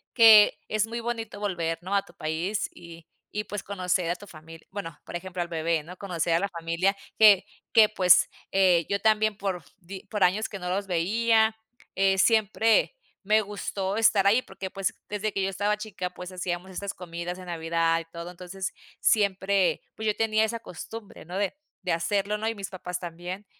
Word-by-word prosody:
que 220 -3 +8
es 215 0 0
muy 235 +1 -4
bonito 230 -3 -4
volver, 170 -5 -1
¿no? 190 +2 -4
A 200 - +4
tu - - -19
país, 165 +7 -2
y 170 -1 -12 0.2
y 210 - -3
pues 210 -1 -5
conocer 180 -3 -1
a 175 - +1
tu 205 - -12
familia, 165 -2 -13
bueno, 190 -5 -6
por - - -8
ejemplo 185 0 -4
al - - -8
bebé, 165 -1 0
¿no? 175 +4 -10
Conocer 175 -4 -1
a 165 - +4
la 200 +2 -1
familia, 170 +3 0 0.2
que 210 -3 +7 0.3
que, 215 -2 +7
pues, 185 -4 +5 0.2
eh, 180 -4 +4
yo 200 - +1
también 215 -1 +2
por 190 -4 -3 0.2
di 190 +2 -8
por 210 -2 0
años 200 +5 +2
que 200 - -6
no 180 -1 -5
los 195 +2 -1
veía, 220 +5 +2 0.4
eh, 195 0 +2
siempre 220 - +3 0.3
me 215 +2 +4
gustó 200 -1 -3
estar 215 -3 +4
ahí, 215 +5 +5
porque, 190 -6 -7
pues, 195 -1 -2
desde 210 +1 -2
que 195 - -1
yo 195 - +1
estaba 205 +2 0
chica, 210 -4 -5
pues, 180 +1 -9
hacíamos 180 0 -4
estas 200 +2 -4
comidas 175 0 -6
en 185 - -10
Navidad 165 -1 +1
y 165 - -8
todo, 170 +1 -8
entonces, 180 +1 -6 0.3
siempre, 200 -2 +2
pues, 220 - -4
yo 210 - +2
tenía 220 -1 +2
esa 230 +1 -3
costumbre, 215 +2 -9
¿no? 180 +3 -5
De 200 +6 -1 0.3
de 180 - -1
hacerlo, 200 +4 0
¿no? 220 +1 -3
Y 225 - -3
mis 195 -2 -6
papás 180 -1 -5
también, 175 +3 -7
195 Hz, 195 wpm, -27 LUFS, 175-210 Hz, 0.4 s, que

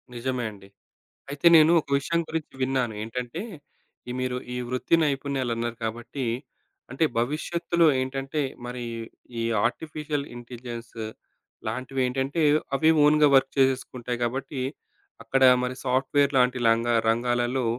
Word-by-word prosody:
నిజమే 125 0 -2
అండి. 95 -2 -15 0.6
అయితే 145 +4 +2
నేను 160 +1 +7
ఒక - - -22
విషయం 170 +4 -1
గురించి 160 -2 -4
విన్నాను. 130 -3 0
ఏంటంటే 125 +7 -5 0.7
ఈ - - -2
మీరు 125 0 -1 0.2
ఈ - - -4
వృత్తి 125 +6 +2
నైపుణ్యాలు 140 -3 -1
అన్నారు 115 0 -3
కాబట్టి, 120 +4 -4 0.7
అంటే 135 +5 +2
భవిష్యత్తులో 165 +6 +1
ఏంటంటే 135 +3 -2 0.2
మరి 125 0 -5 0.6
ఈ - - 0 0.2
ఆర్టిఫిషియల్ 150 -2 -3
ఇంటెలిజెన్స్ 120 -1 -8 0.7
లాంటివి 130 +1 -3
ఏంటంటే, 135 +5 -1 0.3
అవి 155 +3 +4
ఓన్‌గా 150 0 +6
వర్క్ 135 0 +4
చేసేసుకుంటాయి 125 -2 0
గాబట్టి. 130 +3 -3 0.6
అక్కడ 135 +3 +1 0.2
మరి 125 0 -2
సాఫ్ట్‌వేర్ 135 +2 +2
లాంటి 125 0 +3
లంగా 115 +1 +3 0.2
రంగాలలో. 120 +2 +1
130 Hz, 120 wpm, -26 LUFS, 120-140 Hz, 0.7 s, నేను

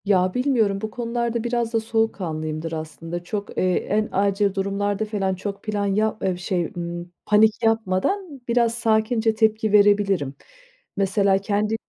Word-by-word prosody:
Ya, 185 -2 +3
bilmiyorum 235 -7 +1
bu 220 - -4
konularda 235 -1 -2
biraz 240 -1 -1
da 225 - +3
soğukkanlıyımdır 165 -8 -2
aslında. 165 +2 -6
Çok, 200 +3 -5
eee, 185 0 +2
en 215 +1 0
acil 200 0 +1
durumlarda 200 +2 -1
falan 195 -3 -1
çok 200 +2 -6
plan 205 -1 -1
ya 215 +2 +1
eee, 185 -2 0
şey, 180 -2 -2
ımm, 175 0 -5
panik 215 +2 +4
yapmadan 225 - 0
biraz 235 -1 +2
sakince 225 0 +1
tepki 220 -1 +2
verebilirim. 200 -8 +3 0.6
Mesela 195 0 +3
kendi 210 +2 0
205 Hz, 140 wpm, -23 LUFS, 190-225 Hz, 0.6 s, panik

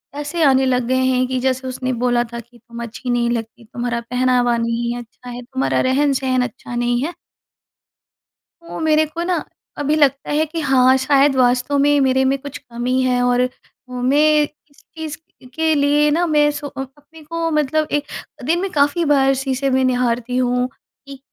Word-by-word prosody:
ऐसे 295 +3 -2
आने 265 -1 +4
लग 250 -1 +1
गए 260 - +1
हैं 255 0 +2
कि 260 0 -2
जैसे 260 0 -1
उसने 255 0 -3
बोला 240 0 +1
था 235 - -4
कि, 240 +1 -15
"तुम 235 +1 -9
अच्छी 240 +2 -7
नहीं 240 -1 +1
लगती, 230 0 -5
तुम्हारा 240 +1 -3
पहनावा 250 -1 +2
नहीं 235 +1 -1
है 245 - -5
अच्छा 245 +2 -14
है 245 0 -7
तुम्हारा 260 +2 -1
रहन-सहन 265 -2 +1
अच्छा 245 0 -10
नहीं 240 0 0
है।" 340 +3 -3 1.6
वो - - -6
मेरे 315 -1 +3
को 335 +3 -5
ना 350 -3 -1 0.3
अभी 295 +1 0
लगता 280 -2 +1
है 310 +2 +2
कि 325 +2 -5
हाँ, 260 -2 +4
शायद 275 +1 +3
वास्तव 250 +2 +2
में 290 +1 +3
मेरे 265 0 +2
में 270 +1 +2
कुछ 285 -1 -8
कमी 245 +2 -2
है 250 -1 +1
और 245 0 +2
अ, 250 - +1 0.4
मैं 290 +5 +3
इस 295 0 -11
चीज़ 315 -2 -6 0.4
के 320 0 +2
लिए 295 +1 +3
ना 345 +3 +2
मैं 295 -1 +3
सो 290 0 -6
अ 270 -1 -7 0.2
अपने 310 +2 -17
को 330 +1 -3
मतलब 305 +1 +1
एक 290 0 -1 0.4
दिन 335 +3 +1
में 390 - -2
काफ़ी 295 +3 +2
बार 270 -2 +3
शीशे 270 0 -1
में 260 0 +2
निहारती 245 -1 0
हूँ 250 0 +1 0.4
कि 275 -1 -10
265 Hz, 190 wpm, -19 LUFS, 245-295 Hz, 1.6 s, आने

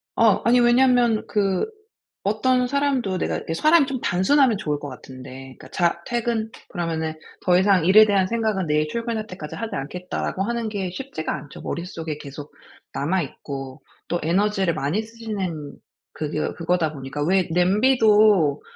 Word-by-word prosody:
어 220 -4 +4
아니 245 +1 +5
왜냐면 240 -2 +4
그 195 - 0 0.6
어떤 250 +5 +2
사람도 265 -8 0
내가 - - -1
이렇게 165 - -5
사람이 310 - +4
좀 260 -3 -4
단순하면 225 +6 +3
좋을 150 -6 -2
것 145 - -6
같은데 130 0 -11
그러니까 - - -14
"자 170 -1 0
퇴근." 235 -2 -1 0.2
그러면은 165 -3 -2 0.3
"더 180 -1 +5
이상 190 -3 +3
일에 215 +4 +8
대한 200 -3 +2
생각은 215 -4 -1
내일 150 0 +1
출근할 230 +1 -3
때까지 165 -5 -8
하지 225 -1 -5
않겠다."라고 180 +6 -3
하는 235 0 -2
게 195 -3 -3
쉽지가 185 -6 -4
않죠. 145 - -10
머릿속에 165 -3 -5
계속 145 0 -9 0.4
남아 175 +6 0
있고. 135 -1 -8 0.3
또 175 - 0
에너지를 190 +1 +1
많이 150 +11 -1
쓰시는 200 -10 -5 0.4
그거 155 0 -3
그거다 165 -2 0
보니까 135 +1 -5
왜 185 +2 +2
냄비도 205 - +4
190 Hz, 340 characters per minute, -23 LUFS, 160-225 Hz, 0.6 s, 일에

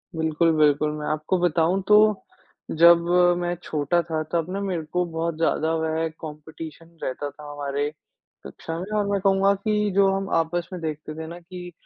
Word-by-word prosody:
बिल्कुल, 160 +1 +2
बिल्कुल। 150 0 +3
मैं 150 - -5
आपको 155 +4 0
बताऊँ 175 +2 +2
तो, 210 - +6 0.9
जब 170 0 +9 0.4
मैं 175 0 -2
छोटा 155 +3 0
था 160 -1 -1
तब 170 0 -1
ना 200 - -2
मेरे 185 -5 -2
को 180 0 +2
बहुत 165 0 -3
ज़्यादा 160 -1 +1
वह 160 0 -1
कॉम्पिटीशन 160 +2 -10
रहता 145 +3 -3
था 145 +1 -11
हमारे 145 0 -2 0.6
कक्षा 165 - -7
में 190 +4 -7
और 205 - +1
मैं 200 - +1
कहूँगा 195 0 +3
कि 210 +1 0
जो 200 0 +5
हम 195 0 -2
आपस 165 +1 0
में 180 - -6
देखते 155 -1 -5
थे 160 0 -6
ना 170 +2 -8
कि 175 +1 -9
165 Hz, 175 wpm, -24 LUFS, 155-180 Hz, 0.9 s, जब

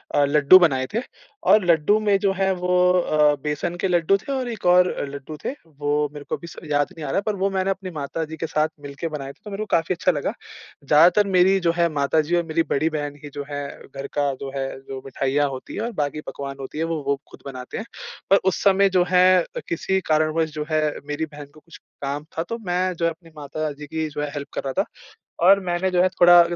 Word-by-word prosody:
अ, 145 - +4
लड्डू 150 +5 +7
बनाए 135 -7 +2
थे 225 - +1 0.5
और 210 -4 +6
लड्डू 170 +5 +4
में 205 -2 +3
जो 195 0 +2
है 190 0 +1
वो 180 0 -1 0.3
अ, 150 -3 +3
बेसन 150 +3 -2
के - - +2
लड्डू 175 +2 +3
थे 220 - -8
और 260 -2 -2
एक 225 -5 -7
और 180 0 +6 0.2
लड्डू 140 +2 -8
थे। - - 0
वो 150 -1 -1
मेरे 145 - -8
को - - 0
अभी 170 - -10
स - - -11 0.2
याद 145 0 +2
नहीं 155 - -6
आ 135 - -3
रहा, - - +1
पर 210 0 -2
वो 195 0 0
मैंने 190 0 -1
अपनी 190 -1 -5
माताजी 160 +1 -4
के 165 - -3
साथ 155 0 +1
मिल 140 -1 -8
के 170 - -2
बनाए 145 -3 -5
थे, - - -34
तो 210 - -9
मेरे 200 +2 -4
को - - -6
काफ़ी 165 +2 +1
अच्छा 180 +2 +2
लगा। 145 -3 -2 0.5
ज़्यादातर 170 +8 +5
मेरी 190 +1 +4
जो 170 -2 +2
है 170 - +4
माताजी 150 +3 +1
और 175 - +2
मेरी 165 0 +1
बड़ी 155 +3 +1
बहन 145 -2 -4
ही 145 - -7
जो 145 - -4
है, 145 -1 -4 0.2
घर 135 0 -7
का 145 -1 +1
जो 135 - -5
है 135 -1 -1
जो 135 0 -8
मिठाइयाँ 135 +2 0
होती 130 -1 -8
है - - -3
और 235 +2 -2
बाकी 145 +1 -2
पकवान 140 -1 -6
होती 135 +2 -7
है, 160 - 0
वो 165 -2 -2
वो 140 -1 +1
खुद - - -15
बनाते 130 -2 -7
हैं। 220 - -5 0.4
पर 195 - +7
उस 190 - +1
समय 195 0 +5
जो 185 -1 +3
है 185 0 +5 0.3
किसी 190 +3 0
कारणवश 155 +1 +2
जो 150 -1 -4
है 155 0 +2 0.3
मेरी 150 +2 -2
बहन 150 -1 -10
को 155 - -16
कुछ 165 +1 -15 0.2
काम 140 +1 -3
था 165 - +1
तो, 230 +7 -5
मैं 185 -3 -1
जो 170 - -1
है 165 - +2
अपनी 165 0 -14
माताजी 150 0 -5
की 160 +1 -2
जो 145 - -5
है 150 - -2
हेल्प 145 -1 -5
कर - - -2
रहा 135 - -2
था - - -15 0.6
और 195 +1 +7
मैंने 175 +1 0
जो 180 -1 +3
है 185 - +4
थोड़ा 175 -1 +7
160 Hz, 245 wpm, -23 LUFS, 145-185 Hz, 0.6 s, लड्डू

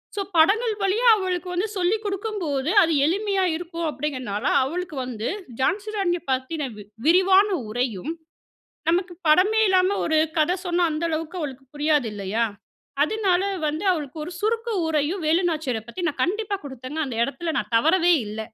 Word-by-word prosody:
So 405 - -1 0.2
படங்கள் 435 +8 +4
வழியா 435 +6 +2
அவளுக்கு 370 -2 -2
வந்து 370 +5 0
சொல்லிக் 405 +5 +1
குடுக்கும்போது, 380 -9 -2
அது 330 -1 +1
எளிமையா 390 +3 +1
இருக்கும். 335 -1 -4
அப்படிங்கிறதுனால, 255 -6 -4 0.2
அவளுக்கு 340 +3 -4
வந்து 230 -3 -4 0.3
ஜான்சிராணிய 390 +1 0
பத்தின 265 +3 -2
வி 205 - -9 0.2
விரிவான 380 +4 +5 0.2
உரையும், 245 - -2 0.8
நமக்கு 355 +1 0
படமே 405 +8 +4
இல்லாம 375 +1 +3
ஒரு 315 -1 +2 0.2
கதை 350 +4 +2
சொன்னா, 350 0 +2
அந்த 310 +2 -2
அளவுக்கு 320 +3 -3
அவளுக்கு 270 -3 -6
புரியாது 295 -5 +1
இல்லையா? 205 +3 -1 0.6
அதனால 385 -1 +1 0.3
வந்து 310 +6 -3
அவளுக்கு 295 -3 -5
ஒரு 355 - -7
சுருக்க 455 +2 -1 0.2
உரையும், 320 +4 0
வேலுநாச்சியர 315 -8 +1
பத்தி 360 +9 -6
நான் 295 - -5
கண்டிப்பா 410 +2 -1
குடுத்தேங்க. 265 +2 -7
அந்த 240 -3 -5
எடத்துல 325 +4 -3
நான் - - -4
தவறவே 340 +6 +4
இல்ல. 215 +1 -5
335 Hz, 145 wpm, -24 LUFS, 290-380 Hz, 0.8 s, விரிவான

